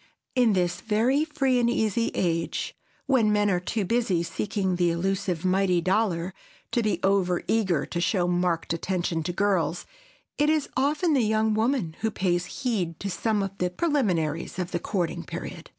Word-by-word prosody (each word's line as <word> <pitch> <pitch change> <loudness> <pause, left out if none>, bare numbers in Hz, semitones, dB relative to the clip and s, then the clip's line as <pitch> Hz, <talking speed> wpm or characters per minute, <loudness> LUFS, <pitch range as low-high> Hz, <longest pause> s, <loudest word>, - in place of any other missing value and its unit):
In 245 -5 +4
this 175 -1 0
very 235 +7 +2
free 270 -5 +1
and 235 -1 +2
easy 230 -1 +1
age, 165 -2 -1 0.3
when 245 -6 +3
men 205 -1 +3
are 180 - +2
too 200 +3 -2
busy 200 -5 +1
seeking 190 0 -2
the 175 -1 +3
elusive 185 0 -1
mighty 185 -1 +3
dollar 185 -1 0 0.4
to 240 - +2
be 215 -2 0
over 190 -2 +2
eager 190 -10 +1
to 170 - -3
show 180 0 +1
marked 175 -2 0
attention 170 -1 -1
to 160 - -2
girls, 180 -3 0 0.5
it 295 +1 +4
is 310 -2 +1
often 295 +5 +2
the 270 - +3
young 220 0 +2
woman 220 - 0
who 220 0 0
pays 180 -4 0 0.2
heed 185 - -1
to 195 - -3
some 210 +3 0
of 195 0 -5
the 180 - +1
preliminaries 180 - 0
of 180 -1 -3
the 175 - -1
courting 175 - -2
period. - - -7
195 Hz, 170 wpm, -26 LUFS, 175-225 Hz, 0.5 s, In